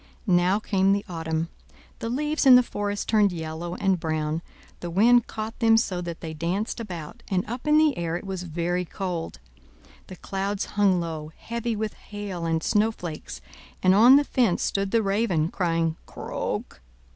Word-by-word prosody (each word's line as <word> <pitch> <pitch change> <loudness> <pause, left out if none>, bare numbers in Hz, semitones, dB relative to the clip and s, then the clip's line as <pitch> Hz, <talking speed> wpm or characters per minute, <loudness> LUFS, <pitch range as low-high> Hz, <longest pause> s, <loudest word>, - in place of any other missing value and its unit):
Now 180 0 +3
came 195 -2 +2
the 200 0 -1
autumn. 165 -1 -3 0.5
The 230 - -3
leaves 295 +4 0
in 255 - +10
the 250 - +7
forest 205 -3 -3
turned 210 -3 +4
yellow 165 +1 -5
and 190 -2 +1
brown; 155 0 -2 0.4
the 175 - -5
wind 230 +7 +4
caught 220 +1 -6
them 225 -2 +5
so 185 -5 0
that 170 -2 -6
they 160 -1 -5
danced 180 +10 -2
about, 175 -9 -7
and 185 -2 0
up 245 +5 -6
in 300 0 +5
the 310 -3 +4
air 170 0 -2
it - - -9
was 190 -2 -4
very 175 +1 -2
cold. 180 -2 -4 0.7
The 185 - -9
clouds 195 +2 -3
hung 200 -3 +3
low, 160 -2 -5
heavy 235 0 -3
with 215 0 -3
hail 200 -5 -6
and 160 -1 0
snowflakes, 180 - -1 0.4
and 185 - +6
on 235 +7 +8
the 290 - +5
fence 240 -10 +1
stood 195 0 0
the 230 +1 +2
raven, 195 -6 +1
crying, 165 -3 0
"Croak! - - -5
190 Hz, 170 wpm, -25 LUFS, 170-220 Hz, 0.7 s, in